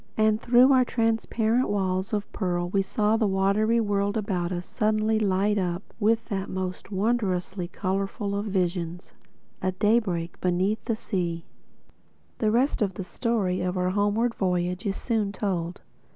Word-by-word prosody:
And 215 Hz, 0 st, +3 dB
through 250 Hz, +3 st, +6 dB
our 255 Hz, -1 st, +5 dB
transparent 225 Hz, +1 st, +1 dB
walls 190 Hz, -2 st, -1 dB
of 205 Hz, -1 st, -1 dB
pearl 175 Hz, -3 st, -1 dB
we 195 Hz, +2 st, +2 dB
saw 210 Hz, +3 st, +1 dB
the 220 Hz, -2 st, +2 dB
watery 200 Hz, +4 st, +2 dB
world 205 Hz, -1 st, 0 dB
about 185 Hz, -4 st, -1 dB
us 175 Hz, -1 st, -3 dB
suddenly 215 Hz, 0 st, +1 dB
light 205 Hz, 0 st, +2 dB
up 180 Hz, 0 st, -2 dB, 0.2 s
with 225 Hz, +1 st, +2 dB
that 195 Hz, -1 st, -2 dB
most 185 Hz, +1 st, -4 dB
wondrously 190 Hz, -4 st, -1 dB
colorful 195 Hz, +3 st, -2 dB
of 200 Hz, +1 st, -2 dB
visions, 180 Hz, -2 st, -2 dB, 0.5 s
a 185 Hz, 0 st, 0 dB
daybreak 185 Hz, -5 st, 0 dB
beneath 185 Hz, +4 st, +1 dB
the 230 Hz, -, 0 dB
sea. 175 Hz, -7 st, -3 dB, 0.9 s
The 215 Hz, -, +2 dB
rest 245 Hz, +4 st, +2 dB
of 195 Hz, -3 st, 0 dB
the 190 Hz, -, -4 dB
story 195 Hz, -2 st, -1 dB
of 180 Hz, +1 st, -1 dB
our 180 Hz, 0 st, +1 dB
homeward 205 Hz, +4 st, +1 dB
voyage 180 Hz, +1 st, -1 dB
is 195 Hz, -, -1 dB
soon 220 Hz, -4 st, -1 dB
told. 180 Hz, -4 st, -3 dB
200 Hz, 150 wpm, -26 LUFS, 185-220 Hz, 0.9 s, through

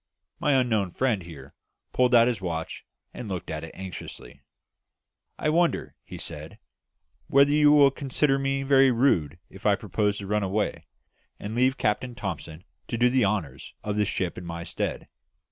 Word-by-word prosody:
My 145 Hz, -, +2 dB
unknown 110 Hz, -8 st, 0 dB
friend 125 Hz, -7 st, 0 dB
here 85 Hz, -3 st, -11 dB, 0.4 s
pulled 125 Hz, -1 st, +3 dB
out 115 Hz, 0 st, +7 dB
his 120 Hz, -6 st, -1 dB
watch 80 Hz, -3 st, -5 dB, 0.3 s
and 120 Hz, -4 st, -7 dB
looked 90 Hz, -3 st, -5 dB
at 80 Hz, 0 st, -4 dB
it 80 Hz, -, -7 dB
anxiously. 90 Hz, -6 st, -9 dB, 1.0 s
"I 155 Hz, -, 0 dB
wonder," 170 Hz, +2 st, +1 dB
he -, -, -9 dB
said, -, -, -7 dB, 0.7 s
"whether 140 Hz, +1 st, +5 dB
you 150 Hz, -1 st, +5 dB
will 145 Hz, -2 st, +6 dB
consider 135 Hz, 0 st, 0 dB
me 135 Hz, 0 st, -1 dB
very 135 Hz, -1 st, +5 dB
rude 105 Hz, -, +2 dB
if 95 Hz, -, -15 dB
I 100 Hz, -, +5 dB
propose 105 Hz, 0 st, -1 dB
to 100 Hz, -, -6 dB
run 105 Hz, +2 st, 0 dB
away, 100 Hz, +2 st, -2 dB, 0.5 s
and 105 Hz, +2 st, -6 dB
leave 130 Hz, +3 st, +2 dB
Captain 120 Hz, +3 st, -1 dB
Thomson 80 Hz, -5 st, -6 dB, 0.2 s
to 120 Hz, -, -3 dB
do 120 Hz, +1 st, +3 dB
the 130 Hz, -3 st, +3 dB
honours 95 Hz, -10 st, -3 dB
of 105 Hz, -1 st, -2 dB
the 105 Hz, 0 st, +2 dB
ship 90 Hz, -3 st, -2 dB
in -, -, -10 dB
my 85 Hz, -1 st, -6 dB
stead? -, -, -4 dB
105 Hz, 170 wpm, -26 LUFS, 95-130 Hz, 1.0 s, out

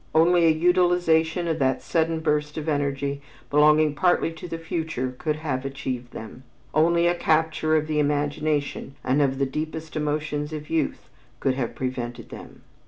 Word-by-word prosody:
Only 170 Hz, +1 st, +5 dB
a -, -, +6 dB
utilization 175 Hz, 0 st, +2 dB
of 160 Hz, -1 st, -1 dB
that 130 Hz, -1 st, +1 dB
sudden 165 Hz, -1 st, 0 dB
burst 150 Hz, -1 st, 0 dB
of 155 Hz, 0 st, -4 dB
energy 140 Hz, -1 st, -1 dB, 0.3 s
belonging 150 Hz, +1 st, +5 dB
partly 175 Hz, +1 st, +2 dB
to 165 Hz, +2 st, -9 dB
the 165 Hz, -, -4 dB
future 160 Hz, -6 st, -3 dB
could 155 Hz, +3 st, -2 dB
have 145 Hz, -4 st, -3 dB
achieved 130 Hz, -3 st, -5 dB
them, 110 Hz, +3 st, -9 dB, 0.3 s
only 170 Hz, +2 st, +3 dB
a 175 Hz, -, +4 dB
capture 160 Hz, -1 st, +1 dB
of 155 Hz, -1 st, +2 dB
the 155 Hz, -1 st, -1 dB
imagination 145 Hz, -1 st, -1 dB
and 130 Hz, +3 st, +2 dB
of 135 Hz, -2 st, +1 dB
the 135 Hz, -, +1 dB
deepest 155 Hz, +3 st, -5 dB
emotions 150 Hz, 0 st, -2 dB
of 150 Hz, 0 st, -7 dB
youth 160 Hz, -3 st, -1 dB, 0.3 s
could 135 Hz, -, +1 dB
have 130 Hz, -3 st, -3 dB
prevented 125 Hz, -2 st, -4 dB
them! -, -, -11 dB
155 Hz, 165 wpm, -25 LUFS, 140-160 Hz, 0.3 s, a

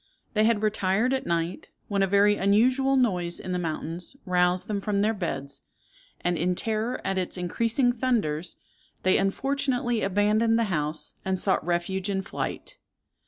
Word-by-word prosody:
They 215 Hz, -1 st, +3 dB
had 220 Hz, -2 st, +2 dB
retired 215 Hz, +3 st, +1 dB
at 265 Hz, -, -2 dB
night, 170 Hz, +1 st, -2 dB, 0.2 s
when 200 Hz, -1 st, 0 dB
a 195 Hz, -, +3 dB
very 200 Hz, +2 st, +4 dB
unusual 250 Hz, +8 st, +3 dB
noise 180 Hz, -9 st, +1 dB
in 185 Hz, -, -6 dB
the 180 Hz, -, -1 dB
mountains 165 Hz, -, -3 dB
roused 180 Hz, 0 st, +2 dB
them 205 Hz, -2 st, -2 dB
from 200 Hz, -1 st, 0 dB
their 220 Hz, +1 st, +2 dB
beds, 140 Hz, -8 st, -4 dB, 0.6 s
and, 175 Hz, -1 st, 0 dB
in 180 Hz, +2 st, +1 dB
terror 225 Hz, +5 st, -1 dB
at 195 Hz, -1 st, 0 dB
its 185 Hz, 0 st, -3 dB
increasing 230 Hz, +8 st, +1 dB
thunders, 205 Hz, -10 st, -1 dB, 0.5 s
they 185 Hz, -, +4 dB
unfortunately 245 Hz, +3 st, 0 dB
abandoned 210 Hz, +4 st, +2 dB
the 230 Hz, -, +2 dB
house, 150 Hz, 0 st, -1 dB
and 190 Hz, 0 st, -1 dB
sought 190 Hz, +1 st, +2 dB
refuge 180 Hz, +3 st, -1 dB
in 195 Hz, -1 st, -1 dB
flight. -, -, -5 dB
195 Hz, 160 wpm, -26 LUFS, 180-225 Hz, 0.6 s, very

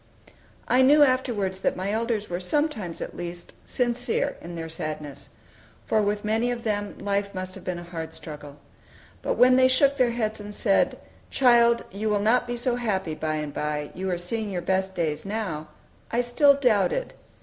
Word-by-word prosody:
I 255 Hz, -, +4 dB
knew 290 Hz, +3 st, +7 dB
afterwards 235 Hz, -8 st, +1 dB
that -, -, 0 dB
my 190 Hz, +2 st, -2 dB
elders 225 Hz, -1 st, -1 dB
were 175 Hz, 0 st, -3 dB
sometimes, 210 Hz, -, -1 dB
at -, -, -6 dB
least, 175 Hz, 0 st, -6 dB
sincere 250 Hz, +3 st, 0 dB
in 170 Hz, +1 st, -8 dB
their 165 Hz, -1 st, -5 dB
sadness; 150 Hz, -3 st, -5 dB, 0.6 s
for 220 Hz, -, +2 dB
with 205 Hz, 0 st, -1 dB
many 225 Hz, +3 st, +1 dB
of 240 Hz, -1 st, -3 dB
them 205 Hz, -2 st, -2 dB
life 200 Hz, 0 st, -2 dB
must 185 Hz, 0 st, -5 dB
have -, -, -10 dB
been 180 Hz, -1 st, -3 dB
a 175 Hz, -, -7 dB
hard 165 Hz, -2 st, -6 dB
struggle. 150 Hz, -3 st, -8 dB, 0.6 s
But -, -, -1 dB
when 255 Hz, +1 st, +6 dB
they 260 Hz, 0 st, +6 dB
shook 275 Hz, +2 st, +3 dB
their 255 Hz, -3 st, +4 dB
heads 220 Hz, -2 st, -2 dB
and 205 Hz, 0 st, -7 dB
said, 200 Hz, -2 st, +2 dB, 0.3 s
"Child, 235 Hz, -2 st, +4 dB
you 210 Hz, +3 st, -2 dB
will 210 Hz, -1 st, +2 dB
not 240 Hz, +4 st, +2 dB
be 240 Hz, 0 st, -3 dB
so 245 Hz, 0 st, 0 dB
happy 195 Hz, -9 st, -1 dB
by 155 Hz, 0 st, -2 dB
and 150 Hz, -1 st, -4 dB
by; 150 Hz, -1 st, -3 dB
you 190 Hz, +1 st, -3 dB
are 180 Hz, -, 0 dB
seeing 210 Hz, +5 st, -3 dB
your 180 Hz, -3 st, -3 dB
best 190 Hz, +1 st, 0 dB
days 155 Hz, -3 st, -1 dB
now," 195 Hz, -7 st, -4 dB, 0.4 s
I 235 Hz, -, +2 dB
still 280 Hz, +4 st, +4 dB
doubted. 275 Hz, -, +1 dB
205 Hz, 185 wpm, -25 LUFS, 175-240 Hz, 0.6 s, knew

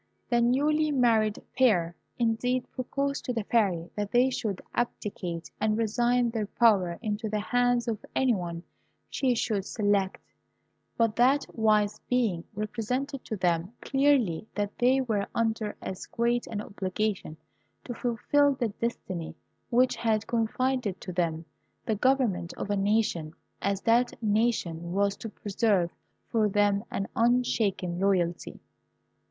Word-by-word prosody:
The 240 Hz, 0 st, +4 dB
newly 295 Hz, +6 st, +2 dB
married 230 Hz, -6 st, +2 dB, 0.2 s
pair, 180 Hz, -10 st, +3 dB, 0.2 s
indeed, 245 Hz, +2 st, 0 dB
proposed 275 Hz, +2 st, -2 dB
to 250 Hz, -, -1 dB
the 225 Hz, -3 st, -2 dB
Fairy 190 Hz, -7 st, +1 dB
that 205 Hz, -1 st, -2 dB
they 250 Hz, +2 st, +4 dB
should 215 Hz, -7 st, -2 dB
abdicate, 180 Hz, -8 st, -3 dB
and 215 Hz, 0 st, +2 dB
resign 240 Hz, +2 st, +2 dB
their 220 Hz, -3 st, -2 dB
power 195 Hz, -7 st, +3 dB
into 215 Hz, 0 st, -2 dB
the 210 Hz, 0 st, -1 dB
hands 245 Hz, +2 st, +1 dB
of 220 Hz, -3 st, -2 dB
any 260 Hz, -2 st, +3 dB
one 170 Hz, -4 st, -4 dB, 0.5 s
she 255 Hz, -3 st, +1 dB
should 210 Hz, -3 st, 0 dB
select; 205 Hz, -2 st, 0 dB, 0.8 s
but 230 Hz, -2 st, +2 dB
that 265 Hz, +4 st, +4 dB
wise 215 Hz, -2 st, +2 dB
being 225 Hz, -9 st, +1 dB
represented 250 Hz, +6 st, -3 dB
to 220 Hz, -, -3 dB
them 180 Hz, +1 st, 0 dB
clearly 270 Hz, -, +2 dB
that 205 Hz, 0 st, -2 dB
they 255 Hz, +2 st, +4 dB
were 215 Hz, -6 st, -1 dB
under 220 Hz, -2 st, 0 dB
as 190 Hz, -, -6 dB
great 240 Hz, +1 st, 0 dB
an 210 Hz, -2 st, -4 dB
obligation 200 Hz, -4 st, -3 dB, 0.5 s
to 245 Hz, -, -5 dB
fulfil 270 Hz, +5 st, +2 dB
the 240 Hz, -3 st, -1 dB
destiny 190 Hz, -7 st, -4 dB, 0.3 s
which 250 Hz, +1 st, +3 dB
had 220 Hz, -2 st, +1 dB
confided 235 Hz, -2 st, -1 dB
to 185 Hz, -, -6 dB
them 165 Hz, -2 st, -1 dB, 0.4 s
the 225 Hz, -, +1 dB
government 215 Hz, -7 st, +1 dB
of 205 Hz, -, -4 dB
a -, -, +2 dB
nation 195 Hz, -6 st, 0 dB, 0.3 s
as 200 Hz, 0 st, 0 dB
that 240 Hz, +2 st, +3 dB
nation 205 Hz, -7 st, 0 dB
was 200 Hz, +1 st, +1 dB
to 225 Hz, -, -6 dB
preserve 200 Hz, -4 st, 0 dB, 0.3 s
for 215 Hz, -2 st, +1 dB
them 205 Hz, 0 st, +2 dB
an 195 Hz, -, -3 dB
unshaken 220 Hz, -7 st, +1 dB
loyalty. 180 Hz, -3 st, 0 dB
220 Hz, 135 wpm, -28 LUFS, 195-245 Hz, 0.8 s, The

